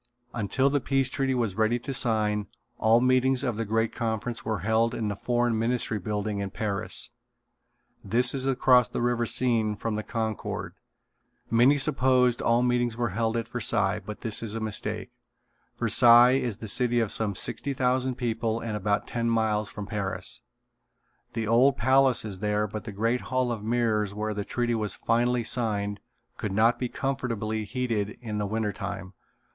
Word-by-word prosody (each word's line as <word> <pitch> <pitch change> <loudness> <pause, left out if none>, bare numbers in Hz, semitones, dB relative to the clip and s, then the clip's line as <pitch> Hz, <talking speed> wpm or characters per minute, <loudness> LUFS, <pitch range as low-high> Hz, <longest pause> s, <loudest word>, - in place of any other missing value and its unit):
Until 120 +5 0
the 145 - +2
Peace 135 0 0
Treaty 135 -1 0
was 115 -6 -1
ready 110 +3 +1
to 135 +3 -6
sign 105 -4 +1 0.3
all 115 +2 +4
meetings 130 +1 +3
of 120 -4 -1
the 115 +1 -3
great 110 +2 0
conference 115 +1 -3
were 110 -5 -2
held 115 +3 +1
in 110 -2 -2
the 100 - -3
Foreign 120 +1 0
Ministry 115 -2 0
building 105 +1 -3
in 100 -1 -3
Paris. 100 -1 -2 0.9
This 125 +2 +2
is 135 -1 -1
across 125 -2 +4
the - - -4
river 120 -1 0
Seine 115 -4 +1
from 110 +2 -3
the - - -2
Concorde. 110 -1 -4 0.8
Many 125 +5 +5
supposed 125 -2 +2
all 115 +1 +2
meetings 120 -2 0
were 120 -1 0
held 115 +3 -1
at 115 -1 -3
Versailles 105 -4 +1
but 105 +2 -8
this 110 -2 +2
is 110 -2 -5
a - - -2
mistake. 110 -2 -4 0.7
Versailles 120 +1 +7
is 115 -6 -3
a - - -4
city 120 +3 +1
of 115 -3 0
some 105 -3 0
sixty 140 +8 -2
thousand 130 0 0
people 115 -2 -2
and 115 -2 -4
about 105 0 -1
ten 115 -1 -2
miles 110 -2 0
from 105 - -7
Paris. 95 -3 -1 0.9
The 115 -1 -2
old 125 +5 +4
Palace 135 -3 +4
is 100 -4 -6
there 105 +1 0
but 105 +2 -7
the 115 - -6
great 115 +5 0
Hall 130 -1 0
of 110 -3 -4
Mirrors 110 -3 0
where 110 0 -2
the 105 0 -3
treaty 120 -1 -1
was 110 -2 -1
finally 120 +1 +1
signed 105 -4 -1 0.4
could 110 - -4
not 115 +4 +3
be 125 - -2
comfortably 115 -6 -3
heated 110 -2 -2
in 110 -3 -5
the 105 - -1
winter 110 0 -1
time. 100 -1 -6
115 Hz, 175 wpm, -26 LUFS, 105-125 Hz, 0.9 s, Versailles